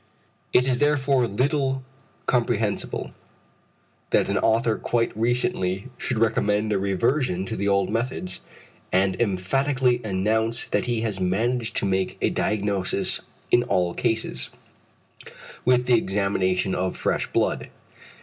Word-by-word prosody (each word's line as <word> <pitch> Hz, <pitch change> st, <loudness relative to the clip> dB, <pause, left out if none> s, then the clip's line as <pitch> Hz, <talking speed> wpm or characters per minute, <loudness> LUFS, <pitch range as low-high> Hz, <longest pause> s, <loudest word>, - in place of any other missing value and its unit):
It 125 Hz, -, +4 dB
is 125 Hz, -2 st, +1 dB
therefore 140 Hz, -4 st, +2 dB
little 135 Hz, +4 st, 0 dB, 0.4 s
comprehensible, 115 Hz, -4 st, 0 dB, 1.0 s
that -, -, +2 dB
an -, -, +1 dB
author 115 Hz, 0 st, +2 dB
quite 115 Hz, -3 st, 0 dB
recently 110 Hz, -3 st, 0 dB
should 125 Hz, -, -2 dB
recommend 110 Hz, -1 st, +1 dB
a 100 Hz, -, +1 dB
reversion 100 Hz, +1 st, 0 dB
to 110 Hz, -, -4 dB
the 100 Hz, -, -1 dB
old 100 Hz, -1 st, +2 dB
methods, 115 Hz, -6 st, -3 dB, 0.5 s
and 95 Hz, 0 st, +2 dB
emphatically 125 Hz, +5 st, +1 dB
announce 110 Hz, +3 st, 0 dB
that -, -, -1 dB
he 120 Hz, -2 st, 0 dB
has 110 Hz, -4 st, -2 dB
managed 115 Hz, +6 st, 0 dB
to -, -, +1 dB
make 95 Hz, -1 st, 0 dB
a -, -, +1 dB
diagnosis 100 Hz, -3 st, -1 dB, 0.3 s
in 120 Hz, -, +6 dB
all 90 Hz, -6 st, 0 dB
cases, 115 Hz, +4 st, -1 dB, 1.2 s
with 125 Hz, 0 st, +4 dB
the 120 Hz, -2 st, +5 dB
examination 95 Hz, -2 st, 0 dB
of 90 Hz, 0 st, -1 dB
fresh -, -, 0 dB
blood. -, -, 0 dB
110 Hz, 125 wpm, -24 LUFS, 95-125 Hz, 1.2 s, in